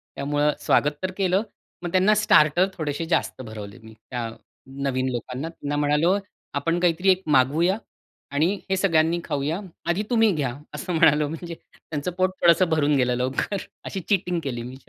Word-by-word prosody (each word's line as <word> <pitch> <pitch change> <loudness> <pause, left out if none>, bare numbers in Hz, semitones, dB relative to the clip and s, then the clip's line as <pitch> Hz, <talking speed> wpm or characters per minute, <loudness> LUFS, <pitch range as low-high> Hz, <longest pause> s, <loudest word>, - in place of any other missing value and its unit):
त्यामुळं 145 +1 +1
स्वागत 145 0 +2
तर 185 - -1
केलं, 190 +1 +2 0.4
मग 175 - -3
त्यांना 190 +3 +4
स्टार्टर 175 -4 +4
थोडेसे 155 0 -3
जास्त 145 - 0
भरवले 110 -2 -8
मी 110 - -13 0.2
त्या 120 -2 -3 0.6
नवीन 130 -1 0
लोकांना. 125 +6 -4
त्यांना 145 -3 -5
म्हणालो, 150 +4 +3 0.4
"आपण 165 +5 0
काहीतरी 175 +2 +2
एक 185 +1 +1 0.2
मागवूया 160 +9 +2 0.5
आणि 155 +7 +2 0.2
हे 190 - +2
सगळ्यांनी 165 -3 +2
खाऊया. 150 +4 -2 0.3
आधी 170 +4 0
तुम्ही 225 -3 +4
घ्या". 140 -8 -2 0.2
असं 185 -2 -4
म्हणालो. 150 -2 +4
म्हणजे 170 +2 -6
त्यांचं 155 +1 -7
पोट 185 0 +3
थोडंसं 170 +1 +5
भरून 150 -2 +2
गेलं 125 -2 +2
लवकर, 130 +10 -1 0.3
अशी 195 - -4
चीटिंग 180 -3 +1
केली 125 -4 -3
मी. 125 +2 -8
155 Hz, 160 wpm, -24 LUFS, 140-180 Hz, 0.6 s, थोडंसं